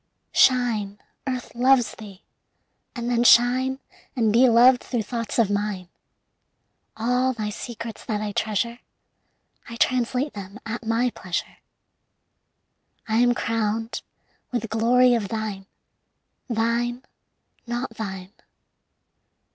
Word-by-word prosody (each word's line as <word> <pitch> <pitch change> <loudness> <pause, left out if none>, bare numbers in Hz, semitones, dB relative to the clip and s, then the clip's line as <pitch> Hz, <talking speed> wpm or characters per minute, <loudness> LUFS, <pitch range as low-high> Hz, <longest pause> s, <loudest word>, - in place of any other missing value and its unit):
Shine, 225 -6 +3 0.3
Earth 255 -2 -4
loves 250 0 +3
thee! 200 -3 -12 0.7
And 240 -1 -4
then 240 -1 +2
shine 255 +2 +5 0.4
And 225 -4 +2
be 250 +2 +6
loved 245 +2 +6
through 240 -4 -2
thoughts 230 -1 -4
of 220 -4 +3
mine. 200 -3 -2 1.1
All 250 +3 +1
thy 215 -3 -4
secrets 230 0 -7
that 210 -2 -2
I 210 0 -3
treasure 220 +3 -1 0.9
I 230 - -7
translate 255 +4 0
them 200 +2 -9
at 230 +2 -5
my 235 +2 +1
pleasure. 180 -5 -5 1.5
I 220 0 +1
am 245 +1 +4
crowned 225 0 -2 0.5
with 240 -2 -2
glory 245 +3 +4
of 225 -4 0
thine. 210 -2 -4 0.8
Thine, 235 +2 0 0.6
not 240 +2 -3
thine. 190 -4 -6
230 Hz, 110 wpm, -24 LUFS, 215-245 Hz, 1.5 s, be